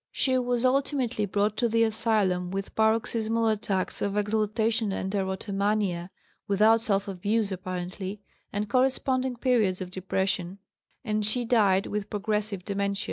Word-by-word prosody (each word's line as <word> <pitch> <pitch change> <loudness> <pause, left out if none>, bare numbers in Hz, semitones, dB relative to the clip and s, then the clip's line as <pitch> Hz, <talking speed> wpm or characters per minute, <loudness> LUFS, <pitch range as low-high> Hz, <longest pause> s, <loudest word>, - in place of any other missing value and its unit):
She 260 -1 +1
was 245 0 0
ultimately 255 -5 +1
brought 205 +2 +1
to 235 - +2
the 230 +1 +3
asylum 210 -5 +1
with 195 +1 -4
paroxysmal 225 +1 +1
attacks 205 -3 -1
of 200 0 -1
exaltation 215 +1 +1
and 190 0 -3
erotomania 195 -1 -1 0.4
(without 215 +3 +4
self 200 -3 0
abuse 200 +3 0
apparently) 185 +1 -5 0.3
and 205 +1 -2
corresponding 260 0 +1
periods 230 -7 +2
of 185 -1 -6
depression, 190 0 -2 0.5
and 215 -3 -1
she 235 +4 0
died 205 -5 +3
with 210 0 -3
progressive 210 -2 -2
dementia. 200 0 -1
210 Hz, 135 wpm, -27 LUFS, 195-225 Hz, 0.5 s, without